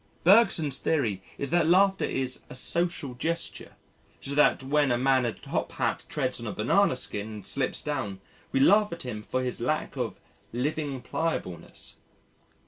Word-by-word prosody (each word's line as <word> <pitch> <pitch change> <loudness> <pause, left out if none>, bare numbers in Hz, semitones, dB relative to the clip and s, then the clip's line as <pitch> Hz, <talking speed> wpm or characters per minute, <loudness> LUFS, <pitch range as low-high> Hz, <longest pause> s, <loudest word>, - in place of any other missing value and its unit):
Bergson's 165 - +5
theory 115 -12 0 0.2
is 140 - -3
that 175 -2 +3
laughter 190 +3 +4
is 130 -1 -2
a - - -8
"social 170 0 -1
gesture" 165 +7 -3 0.5
so 140 - -5
that 150 -2 +4
when 145 0 +2
a 120 - +3
man 130 0 +3
in 115 - -3
a - - -22
top - - -3
hat - - -1
treads - - -1
on - - -5
a - - -2
banana - - +3
skin 105 0 -4
and 105 -3 -8
slips 100 - -1
down 100 -11 -3 0.3
we 135 - +1
laugh 205 +8 +5
at 170 - -6
him 115 -4 -5
for 130 +4 -2
his 125 -2 -3
lack 155 +6 -1
"of - - -3 0.3
living 140 +1 -2
pliableness." 160 - -4
140 Hz, 170 wpm, -28 LUFS, 125-165 Hz, 0.5 s, Bergson's